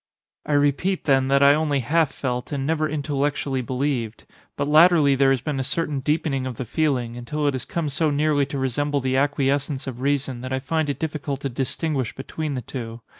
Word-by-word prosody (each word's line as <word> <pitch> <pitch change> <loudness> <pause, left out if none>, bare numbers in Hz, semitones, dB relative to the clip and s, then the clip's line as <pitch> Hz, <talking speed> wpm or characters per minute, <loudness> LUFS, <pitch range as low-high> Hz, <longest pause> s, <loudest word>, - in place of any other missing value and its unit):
"I 150 - 0
repeat, 145 +6 +1
then, 135 -2 +3
that 140 +1 +4
I 140 0 +8
only 150 -2 +1
half 155 +4 +2
felt, 125 -1 -3
and 140 -2 -2
never 155 0 0
intellectually 145 -2 -1
believed. 125 -2 -2 0.3
But - - -1
latterly 155 -1 +6
there 135 0 +4
has 135 -3 +2
been 145 -1 -2
a - - 0
certain 150 +1 -2
deepening 135 -2 0
of 125 -3 -6
the 130 - -4
feeling, 125 -3 0
until 145 +5 -3
it 145 - +2
has 130 -2 -4
come 170 -3 -2
so 155 +2 +1
nearly 145 -1 +2
to 140 0 -4
resemble 140 +2 0
the 130 0 0
acquiescence 140 0 0
of 125 -2 -6
reason, 135 -2 -1
that 130 +1 -6
I - - +1
find 155 +2 -1
it 140 - -2
difficult 145 -3 -3
to 140 - -2
distinguish 135 +1 -2
between 145 +2 -4
the 125 - -4
two. 115 -1 -7
140 Hz, 205 wpm, -23 LUFS, 130-150 Hz, 0.3 s, I